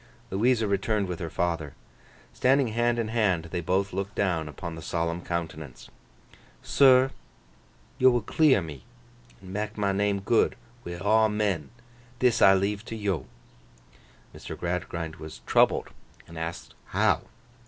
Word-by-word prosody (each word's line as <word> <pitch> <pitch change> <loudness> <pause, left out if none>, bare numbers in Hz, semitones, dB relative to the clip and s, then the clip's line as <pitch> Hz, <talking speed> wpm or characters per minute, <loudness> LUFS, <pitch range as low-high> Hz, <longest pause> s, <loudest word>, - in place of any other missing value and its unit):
Louisa 110 +3 +2
returned 100 +1 0
with 90 -2 -5
her 85 - -4
father. 80 -4 -2 0.6
Standing 135 -1 +3
hand 120 +2 +1
in 115 -2 -1
hand, 95 -8 +1
they 90 - -2
both 95 +3 0
looked 100 +1 -4
down 85 -6 0
upon 85 +2 -7
the 80 - -8
solemn 85 +1 -2
countenance. 80 -6 -6 0.7
'Sir, 130 -1 +5 0.9
yo 130 - +7
will 120 -1 +2
clear 135 - +3
me 75 -4 -9 0.6
an' 95 0 -9
mak 105 +2 -3
my 100 -2 +1
name 100 0 +1
good 110 +4 +2 0.3
wi' 85 0 -6
aw 110 +4 +3
men. 105 -7 -1 0.5
This 125 -1 +2
I 95 0 +8
leave 100 +2 -1
to 115 - -6
yo.' 95 - -2 1.1
Mr. - - -8
Gradgrind 80 -1 -4
was 80 -1 -10
troubled - - +3 0.4
and 85 - -12
asked 80 +1 -6
how? - - +2
100 Hz, 145 wpm, -27 LUFS, 85-110 Hz, 1.1 s, I